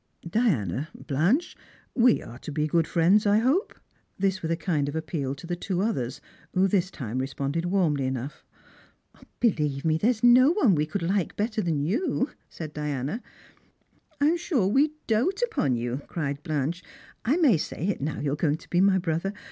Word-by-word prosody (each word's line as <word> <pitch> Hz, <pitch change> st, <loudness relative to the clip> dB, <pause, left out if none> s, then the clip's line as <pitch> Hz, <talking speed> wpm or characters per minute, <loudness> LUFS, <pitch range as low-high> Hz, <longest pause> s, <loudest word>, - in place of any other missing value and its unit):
" -, -, -46 dB
Diana, 155 Hz, -, 0 dB
Blanche, 175 Hz, -, 0 dB, 0.4 s
we 245 Hz, -1 st, +4 dB
are 120 Hz, +2 st, -10 dB
to 150 Hz, -, -7 dB
be 150 Hz, +1 st, 0 dB
good 160 Hz, +1 st, +1 dB
friends, 185 Hz, +5 st, +3 dB
I 205 Hz, +1 st, +5 dB
hope? 270 Hz, -, +1 dB, 0.2 s
" -, -, -42 dB
This 190 Hz, -1 st, 0 dB
with 160 Hz, -, -3 dB
a 165 Hz, -, +2 dB
kind 155 Hz, -5 st, 0 dB
of 145 Hz, -, -6 dB
appeal 150 Hz, -4 st, -3 dB
to 140 Hz, -, -11 dB
the 175 Hz, +1 st, -2 dB
two 180 Hz, +1 st, -2 dB
others, 135 Hz, -, -2 dB, 0.4 s
who 185 Hz, +1 st, +4 dB
this 185 Hz, -2 st, +1 dB
time 130 Hz, -, -5 dB
responded 140 Hz, +5 st, -2 dB
warmly 165 Hz, -8 st, +1 dB
enough. 130 Hz, +2 st, -5 dB, 0.5 s
" -, -, -26 dB
Believe 150 Hz, -, +1 dB
me 160 Hz, 0 st, +2 dB
there 220 Hz, -, +3 dB
is 240 Hz, -3 st, -1 dB
no 250 Hz, +3 st, +7 dB
one 265 Hz, -, +4 dB
we 150 Hz, -2 st, +1 dB
could 170 Hz, +3 st, -3 dB
like 190 Hz, +1 st, 0 dB
better 215 Hz, +1 st, -1 dB
than 170 Hz, -5 st, 0 dB
you," 260 Hz, -, 0 dB, 0.2 s
said 155 Hz, -2 st, -7 dB
Diana, 150 Hz, -, -3 dB, 0.5 s
" 310 Hz, -3 st, -39 dB
I'm 305 Hz, +4 st, +3 dB
sure 310 Hz, -, 0 dB
we 275 Hz, +10 st, +3 dB
doat 290 Hz, -, +1 dB
upon 140 Hz, -, 0 dB
you," 120 Hz, +3 st, -3 dB
cried 145 Hz, -4 st, -3 dB
Blanche. 155 Hz, +3 st, -2 dB, 0.2 s
" -, -, -26 dB
I 270 Hz, +8 st, +3 dB
may 285 Hz, -, +5 dB
say -, -, -5 dB
it 200 Hz, -6 st, -1 dB
now 150 Hz, +2 st, -2 dB
you 140 Hz, -1 st, -1 dB
are -, -, 0 dB
going 150 Hz, -1 st, +1 dB
to -, -, -18 dB
be 175 Hz, -, +3 dB
my 195 Hz, -1 st, +4 dB
brother. 175 Hz, +2 st, -1 dB
170 Hz, 200 wpm, -26 LUFS, 150-220 Hz, 0.5 s, no